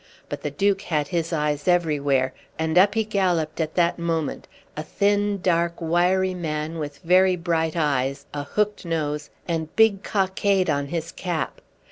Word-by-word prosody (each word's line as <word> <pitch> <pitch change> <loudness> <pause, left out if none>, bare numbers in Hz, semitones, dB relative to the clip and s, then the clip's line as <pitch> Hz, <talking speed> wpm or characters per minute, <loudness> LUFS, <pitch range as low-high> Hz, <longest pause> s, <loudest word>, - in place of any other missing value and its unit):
But - - -5
the 150 - -2
Duke 195 +7 +1
had 150 -6 -1
his 170 -2 -1
eyes 150 -2 -1
everywhere, 145 -7 +2 0.2
and 160 0 -1
up 200 +3 +5
he 220 - +2
galloped 180 -7 0
at 155 -1 -3
that 170 -1 +2
moment 165 -3 -2 0.3
a 155 - -3
thin, 205 +4 +1
dark, 170 -1 +1
wiry 180 +3 +2
man 160 -2 -3
with 145 -2 -5
very 185 +2 +4
bright 165 -2 -1
eyes, 140 -2 0
a 145 - -3
hooked 210 +8 -1
nose, 150 -3 -2 0.2
and 160 -2 -3
big 220 -3 +4
cockade 190 -3 +1
on 140 -1 -1
his 165 +2 -4
cap. 175 -4 -3
170 Hz, 160 wpm, -24 LUFS, 150-185 Hz, 0.3 s, up